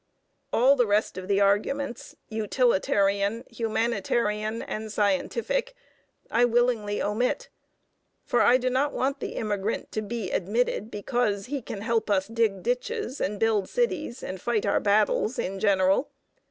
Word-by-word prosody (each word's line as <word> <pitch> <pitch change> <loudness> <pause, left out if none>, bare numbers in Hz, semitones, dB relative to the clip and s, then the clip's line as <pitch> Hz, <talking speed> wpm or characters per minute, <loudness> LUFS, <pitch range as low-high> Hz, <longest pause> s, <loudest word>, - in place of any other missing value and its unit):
All 265 +4 +5
the 245 -4 +2
rest 205 -1 +1
of 185 0 -6
the 200 0 +2
arguments 235 +7 0
utilitarian, 210 -1 +1
humanitarian, 225 -1 -1
and 215 0 -5
scientific 465 - 0 0.6
I 235 - +3
willingly 235 -3 +2
omit. 245 - -1 0.8
For - - +2
I 245 - +6
do 255 0 -1
not 275 +3 +1
want 275 +2 -1
the - - -5
immigrant 210 0 -2
to 215 - -2
be 215 -2 -4
admitted 215 +2 0
because 210 -2 -1
he 275 +2 -4
can 205 -3 -7
help 225 0 0
us 190 -2 +2
dig 220 -4 0
ditches 270 - -2
and 205 +2 -1
build 220 -3 +1
cities 475 - -1
and 185 -1 -6
fight 235 -3 0
our - - +2
battles 210 +3 +2
in 195 +1 -3
general. 195 +3 +3
220 Hz, 140 wpm, -26 LUFS, 205-245 Hz, 0.8 s, I